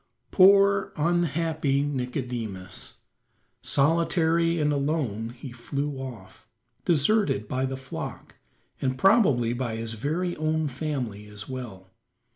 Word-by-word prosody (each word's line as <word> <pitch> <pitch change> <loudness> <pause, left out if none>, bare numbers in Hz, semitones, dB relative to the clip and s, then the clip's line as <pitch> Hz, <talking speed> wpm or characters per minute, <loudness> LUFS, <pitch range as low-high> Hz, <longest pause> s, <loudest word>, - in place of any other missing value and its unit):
Poor, 200 +1 +5
unhappy 160 -3 +1
Nicodemus! 125 -9 -4 0.7
Solitary 165 +2 +2
and 150 -1 +2
alone 140 -7 -1
he 125 +2 -9
flew 140 +4 -4
off, 120 -7 -9 0.4
deserted 170 - +2
by 130 +3 -1
the 135 0 -4
flock, 130 -1 -7 0.4
and 130 -1 0
probably 145 - +4
by 120 -2 -3
his 115 0 -4
very 160 +10 -2
own 155 0 0
family 130 -7 -4
as 105 0 -8
well. 110 -8 -8
140 Hz, 105 wpm, -26 LUFS, 120-160 Hz, 0.7 s, Poor